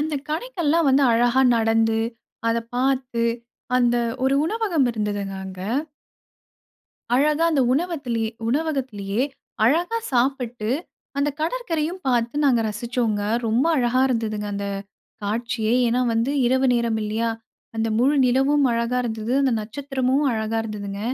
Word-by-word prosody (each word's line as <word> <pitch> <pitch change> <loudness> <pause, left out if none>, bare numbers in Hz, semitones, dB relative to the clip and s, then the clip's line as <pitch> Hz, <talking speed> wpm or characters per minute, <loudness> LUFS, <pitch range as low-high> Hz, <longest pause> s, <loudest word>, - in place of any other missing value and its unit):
அந்த 305 0 -1
கடைக்கெல்லாம் 330 - 0
வந்து, 275 +1 +4
அழகா 240 +3 +3 0.2
நடந்து 225 0 +2 0.5
அத 230 0 +2 0.2
பாத்து, 255 -2 0 0.5
அந்த 240 -1 +3 0.3
ஒரு 270 +1 +3
உணவகம் 365 - +1
இருந்ததுங்க, 205 -3 -3
அங்க 190 -1 -8 1.5
அழகா 300 +4 +3
அந்த 285 -5 +2
உணவத்திலயே 270 -8 -1 0.2
-உணவகத்திலயே, 250 -7 -1 0.4
அழகா 345 - +2
சாப்பிட்டு, 245 -3 0 0.5
அந்த 285 +1 +2
கடற்கரையும் 340 -3 -2
பார்த்து, 240 0 +1
நாங்க 255 -5 +4
ரசிச்சோங்க. 225 -1 -1 0.2
ரொம்ப 230 +6 +2
அழகா 250 -1 +2
இருந்ததுங்க 215 -4 -2
அந்த 200 0 -3 0.6
காட்சியே. 225 +1 -1
ஏன்னா 240 +2 +1
வந்து 230 +5 +1
இரவு 260 +2 +3
நேரம் 235 -2 0
இல்லயா? 225 +2 -1 0.5
அந்த 225 0 0
முழு 270 +5 +3
நிலவும் 270 +3 +3
அழகா 235 +2 0
இருந்தது. 220 0 -3
அந்த 265 -3 +2
நட்சத்திரமும் 265 +4 -1
அழகா 220 0 -1
இருந்ததுங்க. 205 -2 -5
245 Hz, 120 wpm, -23 LUFS, 225-280 Hz, 1.5 s, வந்து